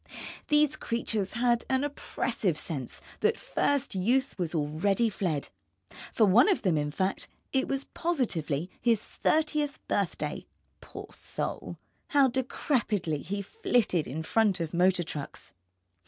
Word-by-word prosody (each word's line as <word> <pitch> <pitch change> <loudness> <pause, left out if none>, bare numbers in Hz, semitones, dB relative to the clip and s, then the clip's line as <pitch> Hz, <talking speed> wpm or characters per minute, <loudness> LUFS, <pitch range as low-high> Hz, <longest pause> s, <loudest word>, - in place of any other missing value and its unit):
These 300 0 +3
creatures 225 -6 -1
had 235 0 +2
an 265 +1 +2
oppressive 235 - -1
sense 135 -7 -4 0.2
that - - +2
first 285 -5 0
Youth 245 +9 +1
was 175 -1 -2
already 165 +9 +1
fled. 170 -8 -2 0.6
For 220 - +4
one 220 - +6
of 385 - +1
them, 180 -5 +3
in 150 -1 0
fact, 185 +6 -1 0.3
it 265 -1 +2
was 275 0 -1
positively 180 - -1
his 230 -3 +3
thirtieth 300 -2 +1
birthday; - - -2 0.3
poor - - -10
soul, - - -4 0.3
how 280 -3 +4
decrepitly 235 - 0
he 200 +4 -3
flitted 225 - +1
in 155 +6 -4
front 205 +1 +2
of 165 -1 -3
motor 180 +1 +3
trucks. 150 -3 -7
210 Hz, 130 wpm, -29 LUFS, 170-265 Hz, 0.6 s, one